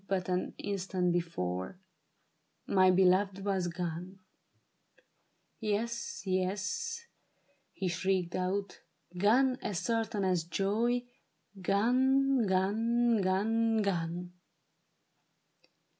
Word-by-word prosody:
But 185 Hz, -2 st, -1 dB
an 180 Hz, 0 st, -1 dB
instant 185 Hz, -3 st, -1 dB
before) 95 Hz, -, -3 dB, 0.9 s
my 185 Hz, -1 st, +4 dB
beloved 190 Hz, +1 st, +3 dB
was 190 Hz, -3 st, 0 dB
gone! 175 Hz, +2 st, -5 dB, 1.4 s
Yes, 230 Hz, +2 st, -2 dB
yes," 190 Hz, -, -2 dB, 0.7 s
he 190 Hz, -, -3 dB
shrieked 180 Hz, 0 st, 0 dB
out, 190 Hz, +2 st, -2 dB, 0.2 s
" 180 Hz, -, -18 dB
gone 255 Hz, +6 st, +3 dB
as 200 Hz, -, -3 dB
certain 225 Hz, 0 st, -1 dB
as 180 Hz, -3 st, +1 dB
joy 210 Hz, +8 st, 0 dB, 0.3 s
— 195 Hz, -, -19 dB
Gone, 255 Hz, +5 st, +3 dB
gone, 225 Hz, +4 st, +2 dB
gone, 220 Hz, +4 st, +1 dB
gone 175 Hz, -2 st, -2 dB
195 Hz, 90 wpm, -31 LUFS, 180-225 Hz, 1.4 s, my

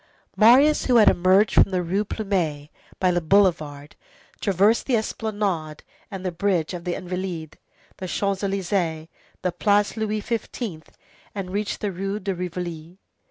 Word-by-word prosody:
Marius, 260 Hz, +7 st, +5 dB
who 250 Hz, -, +2 dB
had 220 Hz, -3 st, +7 dB
emerged 185 Hz, +4 st, +3 dB
from -, -, +5 dB
the 185 Hz, -2 st, -1 dB
Rue 190 Hz, +5 st, 0 dB
Plumet 180 Hz, -9 st, -2 dB, 0.3 s
by 185 Hz, -1 st, +3 dB
the 175 Hz, 0 st, 0 dB
boulevard, 155 Hz, -5 st, +1 dB, 0.4 s
traversed 200 Hz, +3 st, +2 dB
the 260 Hz, -, +2 dB
Esplanade 205 Hz, -8 st, -3 dB, 0.3 s
and 190 Hz, -3 st, -7 dB
the 185 Hz, -, -1 dB
bridge 175 Hz, -2 st, 0 dB
of 175 Hz, 0 st, -7 dB
the 175 Hz, -, -1 dB
Invalides, 180 Hz, -3 st, -5 dB, 0.4 s
the 185 Hz, -, -6 dB
Champs 195 Hz, +1 st, -1 dB
Élysées, 185 Hz, -5 st, -1 dB, 0.3 s
the 180 Hz, -, +1 dB
Place 205 Hz, +3 st, +1 dB
Louis 215 Hz, -1 st, -2 dB
XV., 220 Hz, -5 st, -4 dB, 0.5 s
and 190 Hz, -2 st, -5 dB
reached 205 Hz, +1 st, -3 dB
the 205 Hz, -, -1 dB
Rue 195 Hz, +3 st, -3 dB
de 200 Hz, -2 st, -2 dB
Rivoli. 175 Hz, -1 st, -6 dB
190 Hz, 150 wpm, -23 LUFS, 175-205 Hz, 0.5 s, had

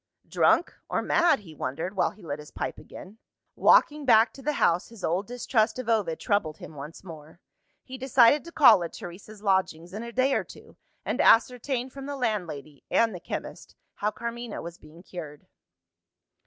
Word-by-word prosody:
"Drunk 345 Hz, -, +2 dB, 0.2 s
or -, -, -1 dB
mad?" 340 Hz, -8 st, +3 dB
he 165 Hz, -6 st, -13 dB
wondered 155 Hz, +8 st, -4 dB
while 190 Hz, -, +2 dB
he 210 Hz, -, -17 dB
lit 150 Hz, -2 st, -5 dB
his 150 Hz, -, -11 dB
pipe -, -, -5 dB
again. 205 Hz, +4 st, -12 dB, 0.4 s
Walking 300 Hz, -1 st, +4 dB
back 225 Hz, -3 st, +5 dB
to 275 Hz, -, -12 dB
the 300 Hz, +2 st, -1 dB
house, 175 Hz, -8 st, +1 dB
his 230 Hz, -4 st, -14 dB
old 185 Hz, +4 st, -1 dB
distrust 235 Hz, -2 st, 0 dB
of 255 Hz, -3 st, -5 dB
Ovid 210 Hz, -8 st, 0 dB
troubled 170 Hz, -7 st, -1 dB
him -, -, -11 dB
once 150 Hz, +4 st, -10 dB
more. 160 Hz, -2 st, -12 dB, 0.4 s
He 260 Hz, 0 st, -9 dB
decided 265 Hz, +2 st, +4 dB
to 340 Hz, -, -10 dB
call 235 Hz, -, +6 dB
at 165 Hz, -, -6 dB
Teresa's 200 Hz, +4 st, -10 dB
lodgings 185 Hz, -4 st, 0 dB
in 210 Hz, -, -5 dB
a 235 Hz, 0 st, -7 dB
day 255 Hz, +3 st, +2 dB
or -, -, +1 dB
two, -, -, -15 dB, 0.3 s
and -, -, 0 dB
ascertain 250 Hz, +2 st, +3 dB
from 275 Hz, +1 st, -8 dB
the 285 Hz, -, -4 dB
landlady 170 Hz, -, -4 dB
(and 230 Hz, -2 st, +2 dB
the 180 Hz, -, -7 dB
chemist) -, -, -7 dB, 0.2 s
how 210 Hz, -, 0 dB
Carmina 235 Hz, +1 st, -6 dB
was 170 Hz, +1 st, -8 dB
being 165 Hz, +3 st, -16 dB
cured. 155 Hz, -6 st, -9 dB
210 Hz, 180 wpm, -27 LUFS, 170-245 Hz, 0.4 s, call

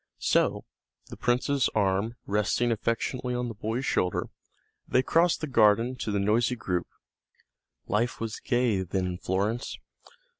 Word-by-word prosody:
So, -, -, +1 dB, 0.5 s
the -, -, -6 dB
prince's 125 Hz, +3 st, +1 dB
arm 100 Hz, +2 st, +1 dB
resting 105 Hz, +4 st, +1 dB
affectionately 120 Hz, +3 st, -1 dB
on 125 Hz, 0 st, -2 dB
the -, -, -5 dB
boy's 110 Hz, +5 st, -3 dB
shoulder, 90 Hz, -8 st, 0 dB, 0.6 s
they 130 Hz, -, +3 dB
crossed 170 Hz, +4 st, +2 dB
the 155 Hz, -, -2 dB
garden 115 Hz, 0 st, +4 dB
to 115 Hz, -, -4 dB
the 100 Hz, -, 0 dB
noisy 115 Hz, +5 st, +2 dB
group. 95 Hz, -5 st, -2 dB, 1.0 s
Life 115 Hz, +4 st, 0 dB
was 115 Hz, -1 st, -4 dB
gay 120 Hz, -6 st, +1 dB
then 95 Hz, +1 st, -2 dB
in 90 Hz, -1 st, -4 dB
Florence. 105 Hz, +6 st, -1 dB
115 Hz, 140 wpm, -27 LUFS, 100-125 Hz, 1.0 s, garden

